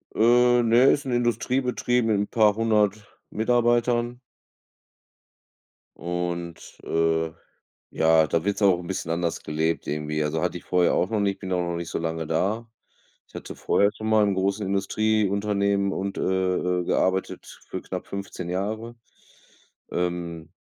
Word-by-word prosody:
Äh, 120 Hz, +2 st, +5 dB
ne, 120 Hz, +2 st, +5 dB
ist 145 Hz, 0 st, 0 dB
'n 130 Hz, -, -3 dB
Industriebetrieb 125 Hz, 0 st, 0 dB
mit 110 Hz, -2 st, +2 dB
'n 100 Hz, -, -1 dB
paarhundert 105 Hz, -1 st, +1 dB
Mitarbeitern. 120 Hz, +1 st, +1 dB, 1.8 s
Und, 85 Hz, -1 st, -5 dB
äh, 80 Hz, 0 st, 0 dB, 0.6 s
ja 80 Hz, 0 st, +4 dB
da 80 Hz, +3 st, -1 dB
wird's 100 Hz, +1 st, -1 dB
auch 95 Hz, -3 st, +5 dB
'n 90 Hz, -, -9 dB
bisschen 90 Hz, -2 st, -4 dB
anders 85 Hz, 0 st, -1 dB
gelebt 80 Hz, +2 st, -1 dB
irgendwie. 75 Hz, +1 st, -2 dB
Also, 80 Hz, +2 st, -1 dB
hatte -, -, -1 dB
ich -, -, -18 dB
vorher 90 Hz, -1 st, +2 dB
auch 90 Hz, -, +1 dB
noch 110 Hz, -2 st, 0 dB
nicht, 100 Hz, -1 st, 0 dB
bin 95 Hz, -2 st, -5 dB
auch 90 Hz, -1 st, +1 dB
noch 85 Hz, 0 st, -3 dB
nicht 85 Hz, -1 st, -5 dB
so -, -, -2 dB
lange 80 Hz, -1 st, -3 dB
da. 100 Hz, +9 st, -1 dB, 0.6 s
Ich -, -, -27 dB
hatte -, -, -7 dB
vorher 100 Hz, 0 st, +2 dB
schon 110 Hz, +1 st, -5 dB
mal 110 Hz, -1 st, +4 dB
in 100 Hz, -, +1 dB
großen 100 Hz, +2 st, -1 dB
Industrieunternehmen 100 Hz, 0 st, +1 dB
und, 100 Hz, +1 st, -3 dB
äh -, -, -2 dB, 0.6 s
äh, -, -, -3 dB
gearbeitet 95 Hz, +2 st, 0 dB, 0.2 s
für -, -, -5 dB
knapp -, -, -6 dB
15 100 Hz, -3 st, -6 dB
Jahre. 110 Hz, +5 st, -3 dB, 1.0 s
Ähm 85 Hz, -2 st, -3 dB
100 Hz, 150 wpm, -25 LUFS, 85-110 Hz, 1.8 s, Äh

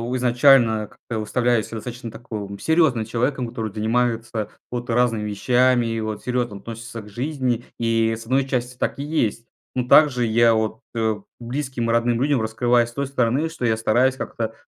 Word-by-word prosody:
изначально 120 Hz, -3 st, +4 dB
как-то 115 Hz, +2 st, -8 dB
выставляю 120 Hz, +1 st, +1 dB
себя 110 Hz, -2 st, -7 dB
таким 120 Hz, -2 st, -7 dB
достаточно 105 Hz, -4 st, -7 dB
серьёзным 155 Hz, -8 st, +2 dB
человеком, 125 Hz, +2 st, -1 dB
который 110 Hz, -3 st, -5 dB
занимается 115 Hz, -1 st, -1 dB, 0.2 s
вот 120 Hz, -1 st, -3 dB
разными 115 Hz, -3 st, +1 dB
вещами 120 Hz, +4 st, +2 dB
и 115 Hz, 0 st, -2 dB
вот 110 Hz, -1 st, -4 dB
серьёзно 120 Hz, -4 st, -2 dB
относится 115 Hz, +2 st, -8 dB
к 105 Hz, -, -13 dB
жизни. 125 Hz, 0 st, -2 dB
И, 115 Hz, -1 st, +2 dB
с 115 Hz, 0 st, -10 dB
1 130 Hz, +2 st, +1 dB
части, 125 Hz, -1 st, -2 dB
так -, -, -2 dB
и -, -, -2 dB
есть. 120 Hz, -7 st, -1 dB, 0.3 s
Ну, 125 Hz, -1 st, -1 dB
также 130 Hz, -6 st, +5 dB
я 115 Hz, +1 st, +4 dB
от 110 Hz, 0 st, -1 dB
э, 110 Hz, -1 st, +1 dB, 0.2 s
близким 125 Hz, -1 st, -3 dB
и 115 Hz, -, +2 dB
родным 120 Hz, 0 st, +1 dB
людям 140 Hz, -3 st, +2 dB
раскрываюсь 120 Hz, +2 st, +2 dB
с 120 Hz, -, -15 dB
той 140 Hz, 0 st, -2 dB
стороны, 135 Hz, +4 st, 0 dB
что 160 Hz, -7 st, -4 dB
я 110 Hz, -1 st, +3 dB
стараюсь 125 Hz, +4 st, +2 dB
как-то 115 Hz, -1 st, -4 dB
120 Hz, 175 wpm, -22 LUFS, 110-125 Hz, 0.3 s, также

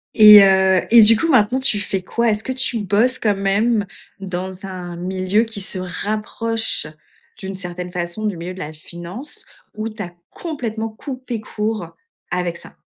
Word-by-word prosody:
Et 210 Hz, -2 st, +10 dB
heu 190 Hz, -1 st, +4 dB
et 235 Hz, 0 st, +8 dB
du 225 Hz, +2 st, +7 dB
coup, 330 Hz, -, 0 dB
maintenant, 255 Hz, -2 st, +3 dB
tu 240 Hz, -6 st, +1 dB
fais 195 Hz, -1 st, -2 dB
quoi? 235 Hz, +5 st, 0 dB
Est-ce 210 Hz, +1 st, -1 dB
que 260 Hz, -, -3 dB
tu 260 Hz, -2 st, -1 dB
bosses 215 Hz, +6 st, +2 dB
quand 210 Hz, -4 st, +1 dB
même 205 Hz, +2 st, +1 dB, 0.3 s
dans 185 Hz, 0 st, -5 dB
un 180 Hz, -2 st, -7 dB
milieu 185 Hz, +4 st, 0 dB
qui 220 Hz, -3 st, -6 dB
se 190 Hz, 0 st, 0 dB, 0.3 s
rapproche, 220 Hz, -2 st, -1 dB, 0.5 s
d'une 195 Hz, -1 st, -6 dB
certaine 180 Hz, -1 st, -6 dB
façon, 175 Hz, +4 st, -4 dB
du 205 Hz, -4 st, -1 dB
milieu 170 Hz, +2 st, -6 dB
de 185 Hz, -, -10 dB
la 155 Hz, -2 st, -6 dB
finance, 175 Hz, -, -8 dB, 0.3 s
ou 215 Hz, +1 st, -3 dB
tu 215 Hz, -1 st, -8 dB
as 175 Hz, -4 st, -6 dB, 0.2 s
complètement 230 Hz, -9 st, -4 dB
coupé 255 Hz, 0 st, -6 dB
court 210 Hz, -5 st, -4 dB, 0.4 s
avec 175 Hz, -1 st, -2 dB
ça? -, -, -12 dB
205 Hz, 170 wpm, -20 LUFS, 185-225 Hz, 0.5 s, Et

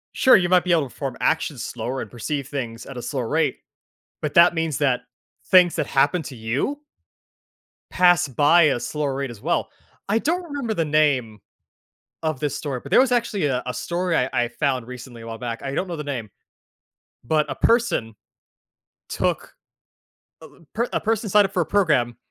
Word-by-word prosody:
Sure, 260 Hz, -, +6 dB
you 175 Hz, -2 st, +2 dB
might 180 Hz, -1 st, +4 dB
be 180 Hz, -, -1 dB
able 165 Hz, -3 st, +4 dB
to 135 Hz, -, -7 dB
perform 135 Hz, -3 st, -5 dB
actions 155 Hz, -5 st, 0 dB
slower 125 Hz, +3 st, -4 dB
and -, -, -8 dB
perceive 140 Hz, +3 st, -4 dB
things 120 Hz, -5 st, -5 dB
at 135 Hz, -, -9 dB
a -, -, -4 dB
slower 125 Hz, 0 st, -3 dB
rate, 155 Hz, -3 st, 0 dB, 0.6 s
but 150 Hz, -, -3 dB
that 170 Hz, +1 st, +7 dB
means 165 Hz, -3 st, -1 dB
that 130 Hz, -4 st, +1 dB, 0.5 s
things 180 Hz, -2 st, +5 dB
that -, -, -1 dB
happen 145 Hz, +6 st, +2 dB
to 135 Hz, -3 st, -9 dB
you 125 Hz, -, -2 dB, 1.1 s
pass 175 Hz, -1 st, +4 dB
by 150 Hz, +6 st, +5 dB
a 135 Hz, -5 st, +2 dB
slower 145 Hz, +1 st, -2 dB
rate 135 Hz, 0 st, -3 dB
as 115 Hz, -4 st, -11 dB
well. -, -, -1 dB, 0.4 s
I 205 Hz, +3 st, +2 dB
don't 340 Hz, +9 st, 0 dB
remember 285 Hz, -8 st, -3 dB
the 165 Hz, -5 st, 0 dB
name 140 Hz, -8 st, +1 dB, 0.8 s
of 155 Hz, -4 st, -1 dB
this 145 Hz, -1 st, -2 dB
story, 140 Hz, -4 st, -4 dB
but -, -, -11 dB
there -, -, +6 dB
was 260 Hz, -1 st, +1 dB
actually 230 Hz, -7 st, 0 dB
a 130 Hz, -2 st, -1 dB
a 125 Hz, -, -3 dB
story 170 Hz, +6 st, -2 dB
I 125 Hz, -3 st, +1 dB
I 120 Hz, 0 st, +1 dB
found 130 Hz, -1 st, -2 dB
recently, 125 Hz, -1 st, -10 dB
a 115 Hz, -, -10 dB
while 115 Hz, 0 st, -6 dB
back, 115 Hz, -1 st, -5 dB
I 135 Hz, 0 st, -4 dB
don't 180 Hz, -, -1 dB
know 170 Hz, -2 st, -5 dB
the 150 Hz, -, -4 dB
name, 125 Hz, -7 st, -4 dB, 1.0 s
but 150 Hz, +4 st, +1 dB
a 135 Hz, -, -3 dB
person 230 Hz, -, +1 dB, 1.0 s
took -, -, -2 dB, 1.0 s
a -, -, -22 dB
per 235 Hz, +2 st, -1 dB
a -, -, 0 dB
person 220 Hz, -1 st, -1 dB
signed 205 Hz, +1 st, +5 dB
up 195 Hz, -, -5 dB
for 180 Hz, -, +1 dB
a -, -, 0 dB
program 150 Hz, -, +1 dB
150 Hz, 195 wpm, -23 LUFS, 125-180 Hz, 1.1 s, that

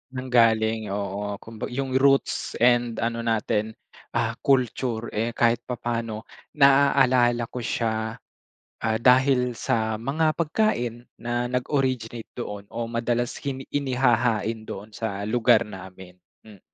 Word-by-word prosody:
Nanggaling, 115 Hz, -4 st, +2 dB
oo. 100 Hz, +1 st, -3 dB
Kumba 110 Hz, +1 st, -7 dB
yung 135 Hz, +1 st, -3 dB
roots 135 Hz, 0 st, +2 dB
and 120 Hz, -1 st, +3 dB
ano 115 Hz, 0 st, -1 dB
natin, 110 Hz, -1 st, -1 dB, 0.4 s
ah, -, -, -1 dB
culture, 125 Hz, -3 st, 0 dB
eh, 115 Hz, +2 st, -2 dB
kahit 115 Hz, 0 st, +3 dB
papaano 115 Hz, -2 st, -3 dB, 0.3 s
naaalala 135 Hz, -4 st, +4 dB
ko 125 Hz, -, -5 dB
siya. 110 Hz, -1 st, -2 dB, 0.7 s
Ah, 110 Hz, 0 st, +1 dB
dahil 125 Hz, 0 st, +4 dB
sa 110 Hz, -1 st, 0 dB
mga 155 Hz, +7 st, 0 dB
pagkain 125 Hz, -, -1 dB, 0.2 s
na 120 Hz, +1 st, -1 dB
nag-originate 125 Hz, -3 st, -2 dB
doon 105 Hz, -4 st, -6 dB
o 115 Hz, 0 st, -4 dB
madalas 120 Hz, +1 st, -1 dB
kini 135 Hz, -1 st, -4 dB
inihahain 120 Hz, -5 st, +1 dB
doon 105 Hz, +3 st, -8 dB
sa 100 Hz, -2 st, -4 dB
lugar 115 Hz, 0 st, +4 dB
namin. 95 Hz, -2 st, -11 dB, 0.3 s
Hmm. 105 Hz, -3 st, -14 dB
120 Hz, 120 wpm, -25 LUFS, 110-125 Hz, 0.7 s, naaalala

